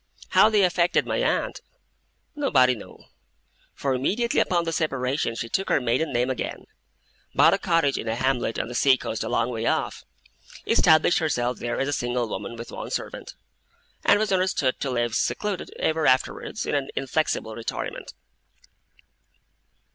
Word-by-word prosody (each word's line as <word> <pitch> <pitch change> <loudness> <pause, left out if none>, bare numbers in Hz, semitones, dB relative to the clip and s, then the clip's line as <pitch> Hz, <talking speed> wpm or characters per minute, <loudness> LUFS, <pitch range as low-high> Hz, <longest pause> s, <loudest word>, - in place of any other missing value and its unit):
How - - +6
they 210 -2 +3
affected 175 -1 +2
my - - -1
aunt, - - 0 0.7
nobody 130 - +3
knew; 110 - -12 0.7
for 135 -1 -1
immediately 210 - 0
upon 175 -2 +2
the 165 - -2
separation, 135 -6 -1
she 115 - -4
took 195 +11 -2
her - - +3
maiden 125 +6 0
name 125 +1 +1
again, 130 - -5 0.7
bought - - +6
a - - +1
cottage 165 -5 +1
in - - -5
a 110 - 0
hamlet 125 -2 0
on - - -2
the 120 - -7
sea 130 +2 +4
coast 110 - -4
a - - -4
long 120 - 0
way 115 -1 -2
off, - - -1 0.6
established 160 +2 +4
herself 125 -7 -1
there 120 0 -3
as 135 - 0
a 145 - -1
single 120 -2 -1
woman 105 +2 -5
with 115 0 -8
one - - -6
servant, - - -5 0.7
and 205 - +5
was 215 -1 0
understood 185 -8 +1
to 140 - -2
live 120 -2 -1
secluded, 205 - -1
ever 160 -1 +1
afterwards, 130 0 0
in - - -2
an 140 -2 -1
inflexible 135 -4 -1
retirement. 115 - -5
135 Hz, 160 wpm, -25 LUFS, 120-165 Hz, 0.7 s, How